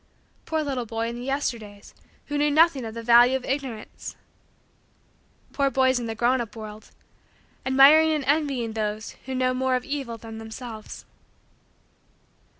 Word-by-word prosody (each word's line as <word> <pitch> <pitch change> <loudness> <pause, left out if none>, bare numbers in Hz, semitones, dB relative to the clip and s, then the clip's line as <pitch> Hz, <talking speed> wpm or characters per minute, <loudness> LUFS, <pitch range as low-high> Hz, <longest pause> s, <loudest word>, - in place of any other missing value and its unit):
Poor 315 -1 0
little 260 -5 -3
boy 225 +1 -2
in 235 - -6
the - - -7
Yesterdays 230 -7 -4 0.3
who 290 - -3
knew 295 0 +3
nothing 295 -4 +4
of 220 0 -7
the 230 - -6
value 240 +2 +6
of 255 - -10
Ignorance! 265 -5 -5 1.4
Poor 280 -1 +2
boys 260 -1 +2
in 235 - -4
the 225 - -4
grown 245 +3 +2
up 230 -1 -7
world 215 -1 -9 0.8
admiring 285 +4 +7
and 300 -3 -1
envying 275 -6 0
those 215 0 -3 0.2
who 260 - -3
know 255 0 +1
more 260 0 +1
of 250 - -2
evil 275 -5 -4
than 225 0 -9
themselves! 220 0 -9
255 Hz, 150 wpm, -25 LUFS, 225-275 Hz, 1.4 s, admiring